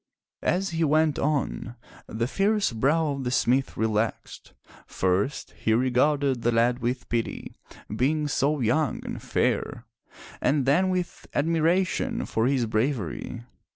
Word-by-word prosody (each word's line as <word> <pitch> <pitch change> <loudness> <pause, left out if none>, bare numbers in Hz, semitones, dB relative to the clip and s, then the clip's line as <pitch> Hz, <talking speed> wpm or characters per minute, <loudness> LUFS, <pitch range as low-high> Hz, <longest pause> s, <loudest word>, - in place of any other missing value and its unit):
As 190 +1 0
he 165 0 0
went 155 0 +2
on, 140 -5 -1 0.3
the 115 +1 -2
fierce 200 +5 +1
brow 145 +7 +2
of 140 -1 -4
the 125 - -1
smith 130 +1 +1
relaxed. 110 0 -2 0.3
First, 95 +9 -1
he 110 - -1
regarded 130 +1 +2
the 120 - +2
lad 120 +2 +2
with 125 +1 -2
pity, 115 -1 -3 0.4
being 150 +6 +1
so 145 +1 0
young 130 +6 0
and - - -5
fair, - - -1 0.6
and 140 -2 +2
then 175 +8 +3
with 180 -1 -3
admiration 170 - +1
for 115 +2 0
his 130 -3 +1
bravery. 115 +1 -2
135 Hz, 130 wpm, -26 LUFS, 120-155 Hz, 0.6 s, then